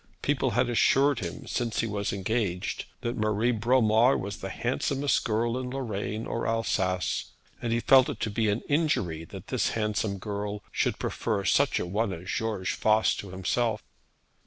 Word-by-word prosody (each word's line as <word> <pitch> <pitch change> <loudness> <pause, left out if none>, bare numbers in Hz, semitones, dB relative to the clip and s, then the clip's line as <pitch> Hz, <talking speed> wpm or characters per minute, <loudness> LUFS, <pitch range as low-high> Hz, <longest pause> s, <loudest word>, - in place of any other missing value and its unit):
People 140 -2 +1
had 125 0 +3
assured 135 +3 +3
him 85 -5 -6
since 115 -2 -1
he - - -1
was 100 -2 -2
engaged 100 -2 -2 0.2
that 120 +1 -2
Marie 110 +1 +1
Bromar 115 +1 +4
was 100 +2 -5
the 95 - -6
handsomest 135 +6 0
girl 115 +2 0
in 125 -1 -4
Lorraine 110 -4 -3
or 115 - -2
Alsace; 95 -5 0 0.4
and 120 - -2
he 115 - +2
felt 130 +2 +6
it - - -5
to 110 - -1
be 110 0 +1
an 105 +3 0
injury 105 - 0
that - - -10
this - - +1
handsome 105 -2 -1
girl 105 +1 -4
should - - 0
prefer 105 -4 -2
such 140 -1 +3
a - - -2
one 105 +4 -1
as 90 +1 -8
George 105 -2 -1
Voss 110 0 +3
to 100 - -7
himself. 105 +4 -1
110 Hz, 170 wpm, -28 LUFS, 100-120 Hz, 0.4 s, felt